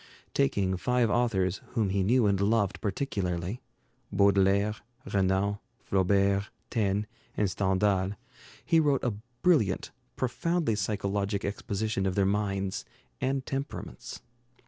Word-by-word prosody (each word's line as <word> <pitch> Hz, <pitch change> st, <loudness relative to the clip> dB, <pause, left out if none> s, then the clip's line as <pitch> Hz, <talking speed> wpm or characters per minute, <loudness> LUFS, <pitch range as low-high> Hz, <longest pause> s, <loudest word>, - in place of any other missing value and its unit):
Taking 95 Hz, +7 st, +1 dB
five 125 Hz, +3 st, +2 dB
authors 100 Hz, -6 st, +1 dB
whom 110 Hz, -4 st, +1 dB
he 100 Hz, +1 st, +1 dB
knew 115 Hz, +5 st, +3 dB
and 100 Hz, -1 st, +2 dB
loved 105 Hz, -1 st, +1 dB
particularly, 95 Hz, -2 st, -2 dB, 0.5 s
Baudelaire, 100 Hz, +1 st, +3 dB, 0.3 s
Renan, 100 Hz, -1 st, +1 dB, 0.2 s
Flaubert, 100 Hz, +1 st, +2 dB, 0.2 s
Taine, 105 Hz, -3 st, +1 dB, 0.3 s
and 105 Hz, -, +2 dB
Stendhal, 95 Hz, 0 st, +1 dB, 0.5 s
he 165 Hz, +3 st, +4 dB
wrote 145 Hz, -4 st, +2 dB
a 120 Hz, -, +1 dB, 0.3 s
brilliant, 125 Hz, -, +3 dB, 0.2 s
profoundly 165 Hz, +2 st, 0 dB
psychologic 100 Hz, -1 st, -1 dB
exposition 100 Hz, 0 st, -2 dB
of 95 Hz, -, -1 dB
their 100 Hz, -, +3 dB
minds 100 Hz, -1 st, -1 dB, 0.4 s
and 135 Hz, 0 st, 0 dB
temperaments. 135 Hz, +1 st, -5 dB
100 Hz, 110 wpm, -29 LUFS, 95-115 Hz, 0.5 s, he